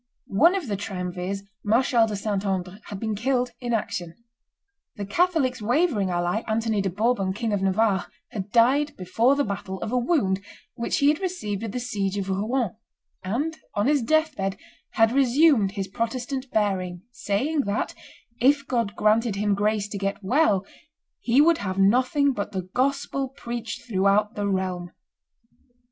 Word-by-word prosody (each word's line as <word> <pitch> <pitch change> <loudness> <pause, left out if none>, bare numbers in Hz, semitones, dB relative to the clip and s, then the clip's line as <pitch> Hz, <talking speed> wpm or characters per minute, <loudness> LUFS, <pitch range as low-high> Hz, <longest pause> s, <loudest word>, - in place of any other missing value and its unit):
One 330 - +4
of 365 -8 -3
the 205 - -1
triumvirs, 185 0 -4 0.2
Marshal 230 +1 +3
de 210 - -3
Saint 200 -1 -2
Andre, 190 -1 -2
had 200 - -7
been 220 0 -2
killed 245 +3 0
in 240 -1 -3
action. 175 -6 -2 0.8
The 205 -3 -5
Catholics' 275 - +1
wavering 240 - +1
ally, 175 +4 0
Anthony 220 -1 0
de 195 - -1
Bourbon, 200 0 0
King 225 +1 -2
of 200 - 0
Navarre, 195 -1 +2 0.2
had 200 -1 -5
died 265 +6 +3
before 225 +9 +2
the 285 - +1
battle 190 -3 -4
of - - -3
a 250 - +2
wound 235 - +1 0.3
which 235 - -2
he 280 - +4
had 300 +2 +2
received 285 - -3
at 225 - -3
the 250 - -3
siege 205 -5 -2
of 195 -1 -3
Rouen; 215 +3 0 0.5
and 270 +12 -1 0.2
on 205 - +1
his 285 0 +3
death 315 +4 +2
bed 195 0 -2 0.4
had 225 0 +4
resumed 265 -5 +4
his 195 -2 -3
Protestant 245 +5 -3
bearing, 185 -5 -1
saying 260 +8 0
that, 200 +1 -1 0.5
if 280 +3 +3
God 230 -6 -1
granted 215 0 +2
him 205 0 +1
grace 205 0 0
to 205 - -5
get 195 +1 -3
well, 205 -4 +2 0.5
he 250 +4 +4
would 330 +2 +4
have 190 -1 -3
nothing 255 +8 +3
but 205 -2 -4
the 185 -2 -4
gospel 275 0 0
preached 240 -3 -6
throughout 205 0 +2
the 205 -2 -2
realm. 185 -2 -2
215 Hz, 165 wpm, -25 LUFS, 195-255 Hz, 0.8 s, One